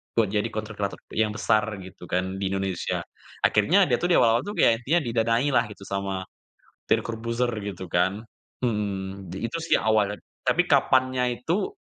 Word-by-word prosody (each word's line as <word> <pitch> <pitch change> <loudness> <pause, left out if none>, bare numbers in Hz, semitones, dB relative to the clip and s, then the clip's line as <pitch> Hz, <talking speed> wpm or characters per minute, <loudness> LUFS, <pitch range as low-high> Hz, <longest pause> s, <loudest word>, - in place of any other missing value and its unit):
buat 110 -4 +2
jadi 105 -1 +1
content 110 0 -6
creator 100 -1 -1 0.2
yang 110 -1 0
besar 110 0 +2 0.2
gitu 90 -1 -11
kan, 95 +2 -1
di 95 - -1
Indonesia. 95 -1 -2 0.4
Akhirnya, 170 - +4
dia - - +1
tuh 175 - 0
di 175 - +4
awal-awal 115 0 +4
intinya 205 - -4
tuh - - -11
kayak 115 - +6
dia 165 +5 +4
didanailah 120 +2 +2
gitu, - - -14
sama 100 -1 -3 0.7
Deddy - - +3
Corbuzierr 115 +2 -2
gitu 100 -3 -6
kan 95 +5 +1 0.4
mhm, 100 -4 -2
di 95 +5 -3
itu 120 - -4
sih 165 - +3
awalnya, 105 -2 +2 0.3
tapi 175 - +3
kapannya 130 -2 +3 0.2
itu, 200 - -1
110 Hz, 170 wpm, -25 LUFS, 95-125 Hz, 0.7 s, kayak